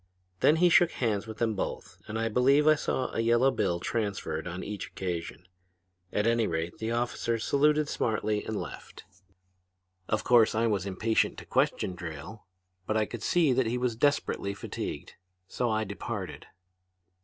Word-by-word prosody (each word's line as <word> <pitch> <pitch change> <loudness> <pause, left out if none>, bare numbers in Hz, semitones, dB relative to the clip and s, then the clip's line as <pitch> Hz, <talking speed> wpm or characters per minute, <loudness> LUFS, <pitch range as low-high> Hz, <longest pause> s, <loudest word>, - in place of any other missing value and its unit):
Then 155 - +5
he 175 +2 +4
shook 175 0 +5
hands 110 -4 -1
with 110 -1 -7
them 115 -1 +1
both 95 - -5
and 110 - -4
I 115 0 0
believe 135 +6 +4
I 155 - +7
saw 130 -3 -2
a - - -2
yellow 120 +3 +4
bill 90 -7 0
transferred 100 -7 -2
on 90 +2 -5
each 105 -1 -5
occasion. 90 -1 -5 0.6
At 105 - 0
any 115 -1 +2
rate 80 +1 -3
the 110 - -2
officers 115 -1 -1
saluted 150 +1 +3
smartly 110 -4 -1
and 110 -1 -3
left. - - -9 1.1
"Of 110 - 0
course 115 -3 +5
I 115 +1 +2
was 100 -4 0
impatient 110 +4 +1
to - - -9
question 95 - +1
Drayle, 85 +4 -8 0.4
but 110 - +1
I 110 - +2
could 120 +1 -7
see 160 +1 +3
that 125 -1 +2
he 120 +2 0
was 125 -2 -1
desperately 120 -6 0
fatigued. - - -6 0.3
So 120 +4 -1
I 110 0 +1
departed. 100 -1 -6
110 Hz, 165 wpm, -29 LUFS, 100-125 Hz, 1.1 s, I